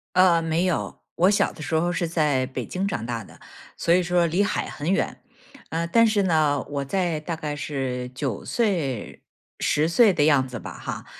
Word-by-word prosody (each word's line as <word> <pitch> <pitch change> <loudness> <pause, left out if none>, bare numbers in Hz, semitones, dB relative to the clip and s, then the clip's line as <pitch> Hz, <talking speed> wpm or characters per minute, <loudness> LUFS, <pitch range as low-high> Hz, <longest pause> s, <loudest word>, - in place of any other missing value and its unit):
呃， 180 -2 +5
没 165 +3 0
有。 180 - -2
我 180 +3 +4
小 205 - +2
的 155 - -10
时 155 - -3
候 165 +2 +2
是 175 0 -1
在 150 -6 +1
北 130 - -5
京 190 +2 -2
长 175 - -3
大 115 -1 -3
的， - - -16 0.4
所 170 - +2
以 180 - +4
说 175 0 +2
离 170 +5 +1
海 200 - -1
很 155 +5 -2
远。 - - -1 0.5
呃， 165 +1 -1
但 230 +7 +4
是 215 -2 +2
呢， 155 -6 +2
我 140 -1 -3
在 175 +1 -1
大 165 +2 -4
概 150 -2 -4
是 135 -4 -3
9 130 -5 -3
岁、 170 - -1 0.4
10 150 +2 +1
岁 210 +4 +5
的 150 -4 +2
样 145 -4 +4
子 125 -2 -6
吧 - - -8
哈， - - -6
160 Hz, 205 characters per minute, -24 LUFS, 145-180 Hz, 0.5 s, 呃